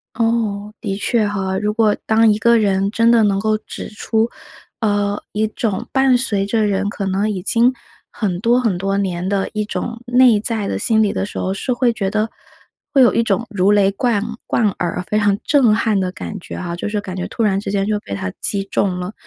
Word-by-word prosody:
哦， 220 -3 -1
的 195 - -2
确 215 +1 +1
哈。 190 -2 -2
如 210 +1 -1
果 215 -1 +2
当 220 0 +4
一 210 - -2
个 235 +1 +4
人 195 -2 +1
真 230 +1 +3
的 230 -2 +5
能 200 -2 +2
够 215 +1 +1
指 - - -8
出， 220 +2 -1 0.5
呃， 205 -2 0
一 215 +1 +1
种 215 -2 -3
伴 265 -1 +4
随 205 -6 +1
着 215 +1 +1
人 200 0 0
可 200 -1 -4
能 195 +3 0
已 195 -3 -3
经 240 +5 +3 0.4
很 190 -5 -2
多 235 +4 +3
很 225 -8 0
多 195 +2 -1
年 185 -2 -2
的 195 0 -1
一 215 0 -1
种 230 +2 -5
内 245 -3 +5
在 215 -1 -2
的 - - -2
心 220 -2 +3
理 205 - 0
的 - - -1
时 205 - -8
候， 190 - -1
是 250 +6 -2
会 245 -1 +1
觉 200 -4 -2
得 215 +2 -1 0.6
会 275 - +4
有 240 - +4
一 - - +2
种 220 -1 0
如 200 -1 +2
雷 200 -1 +4
贯 210 0 0 0.2
贯 220 -3 +2
耳 175 0 -2
非 210 +3 0
常 205 -1 +2
震 255 -8 +4
撼 215 -2 +1
的 185 -1 -1
感 205 +2 -7
觉 - - -9
啊， 175 -2 -4
就 175 - -4
是 210 0 -1
感 185 -2 -7
觉 185 - -3
突 230 - -3
然 195 -2 +2
之 200 - -4
间 195 -1 0
就 210 0 0
被 100 - -6
他 95 -1 -4
击 200 -1 +1
中 195 -1 -1
了。 180 +3 -5
210 Hz, 245 characters per minute, -19 LUFS, 195-225 Hz, 0.6 s, 的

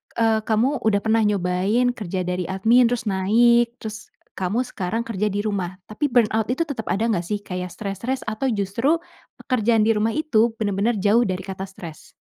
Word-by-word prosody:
eee, 225 -1 +2
kamu 240 +5 +1
udah 200 -2 +3
pernah 220 +1 +2
nyobain 200 +5 +1
kerja 190 -6 -4
dari 180 -1 -2
admin, 225 +6 +4
terus 245 0 -1
naik, 235 +4 +3
terus 215 -1 -7 0.3
kamu 205 +7 0
sekarang 215 +5 -3
kerja 210 -2 -2
di 205 +1 -2
rumah. 190 -4 -2
Tapi 250 +8 -1
burnout 225 -3 +2
itu 260 +7 0
tetep 275 -9 -6
ada 205 +3 0
enggak 180 -6 -1
sih? 210 - -2
Kayak 180 -1 -5
stres-stres 220 +6 -4
atau 225 +4 -2
justru 230 - 0 0.4
pekerjaan 230 -3 +2
di 225 - +3
rumah 215 +2 +1
itu 235 -8 +2
bener-bener 215 +1 0
jauh 215 +5 +4
dari 185 0 -3
kata 190 0 -6
stres? 170 -5 -11
215 Hz, 175 wpm, -22 LUFS, 195-235 Hz, 0.4 s, admin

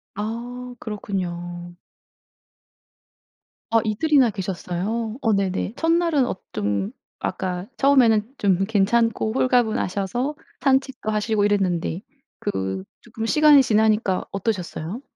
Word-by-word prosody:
아. 240 +4 -5
그렇군요. 175 -4 -5 1.9
아 225 - +4
이틀이나 245 +3 +3
계셨어요? 200 +4 -3
어 225 -4 +2
네네. 195 +1 -1
첫날은 330 -4 +2
어 240 - -2 0.2
좀 100 -1 -1 0.3
아까 180 -1 -3
처음에는 245 -4 +4
좀 195 -1 +2
괜찮고 220 +2 +2
홀가분하셔서 240 0 +1 0.3
산책도 265 -4 +1
하시고 210 -1 +1
이랬는데 185 -4 0 0.4
그 95 - -3 0.2
쪼끔 225 -1 -6
시간이 300 +1 +6
지나니까 215 -4 +2
어떠셨어요? 195 0 -3
215 Hz, 250 characters per minute, -23 LUFS, 190-245 Hz, 1.9 s, 시간이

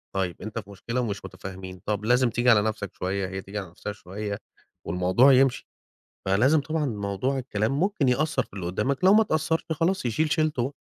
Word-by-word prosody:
طيب 95 -3 -2
أنت 110 +2 -4
في 100 - -11
مشكلة 115 +5 -3
ومش 105 -4 -4
متفاهمين، 95 -1 -8
طب 105 0 -2
لازم 125 +2 +4
تيجي 120 +2 +1
على 110 -4 +6
نفْسك 105 -2 -3
شوية، 95 +1 -2
هي 95 +1 -5
تيجي 100 +2 -8
على 95 -3 -7
نفْسها 90 +4 -6
شوية، 100 +1 -6 0.5
والموضوع 90 +10 +4
يمشي، 130 -1 +3 0.6
فلازم 125 +11 +4
طبعًا 155 +1 -1
موضوع 105 +3 -2
الكلام 110 -4 -1
ممكن 185 -7 +1
يأثّر 155 +5 +1
في - - -25
اللي 95 -3 -5
قدّامك، 130 - -1
لو 190 +2 +7
ما 215 - +7
اتأثّرش 160 -5 0
خلاص، 165 +1 0
يشيل 150 +7 0
شيلته 155 -5 +1
بقى. 135 +4 -3
115 Hz, 195 wpm, -26 LUFS, 100-140 Hz, 0.6 s, لو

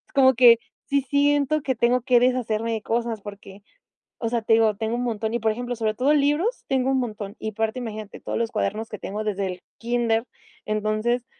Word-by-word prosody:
como 265 -1 +6
que 235 -1 +8 0.3
sí 280 0 +1
siento 285 +2 +2
que 265 -2 -1
tengo 240 +2 +2
que 250 0 +4
deshacerme 230 -3 0
de 220 - -3
cosas 230 -1 -2
porque, 200 -1 -11 0.6
o 230 - -1
sea, 235 0 0
te 220 +1 +2
digo, 225 -2 +4
tengo 220 +1 -2
un 245 - -2
montón 220 -2 -2
y 235 - 0
por 220 0 +1
ejemplo, 245 +2 -4
sobre 220 -2 -1
todo 265 +6 +2
libros 300 - +1
tengo 265 -1 +1
un 265 - +2
montón 210 -4 -5
y, 220 - -3
aparte, 220 +3 -2
imagínate 215 -3 -7
todos - - -3
los 230 -1 -1
cuadernos 215 +1 -2
que 210 - -7
tengo 210 +2 -4
desde 200 -2 -1
el 180 -1 -6 0.2
kinder. 230 -1 0 0.4
Entonces, 215 +3 0
230 Hz, 205 wpm, -24 LUFS, 215-250 Hz, 0.6 s, que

